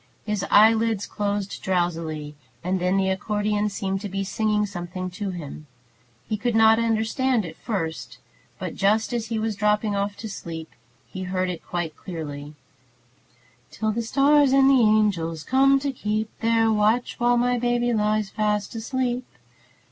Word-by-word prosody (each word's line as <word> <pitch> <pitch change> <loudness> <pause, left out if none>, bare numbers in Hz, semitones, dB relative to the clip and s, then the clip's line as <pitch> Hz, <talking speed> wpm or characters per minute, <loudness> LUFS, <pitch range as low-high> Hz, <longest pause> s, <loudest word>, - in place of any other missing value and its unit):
His 210 -2 -2
eyelids 220 -1 +4
closed 205 -1 -3
drowsily, 165 -5 -2 0.3
and 185 +2 0
then 180 +2 +1
the 190 0 +2
accordeon 210 +2 0
seemed 195 -1 -3
to 205 - -5
be 195 +1 -2
singing 210 +1 0
something 185 -1 -5
to 200 +2 -4
him. 155 -4 -7 0.6
He 215 - -1
could 240 +1 -1
not 225 0 +6
understand 230 +1 +1
at 160 -1 -8
first, 165 -8 -4 0.4
but - - -5
just 215 +4 +1
as 230 -2 -2
he 225 0 -2
was 220 -1 -1
dropping 210 0 +1
off 200 0 -2
to 225 - -6
sleep 165 -5 -7 0.3
he 185 - -8
heard 185 0 -1
it 170 - -7
quite 175 -3 -4
clearly: 150 -4 -7 1.1
"Till 220 -1 -2
the 230 +2 -2
stars 280 +3 +4
and 270 0 +6
the 265 -2 +5
angels 200 -8 +2
come 275 +1 +4
to 280 0 -1
keep 215 -3 -2
Their 225 0 +3
watch, 220 +4 +1
where 240 0 +3
my 245 0 +1
baby 240 0 +1
lies 210 -2 0
fast 210 -1 -1
asleep." 245 +2 -2
210 Hz, 155 wpm, -24 LUFS, 185-225 Hz, 1.1 s, not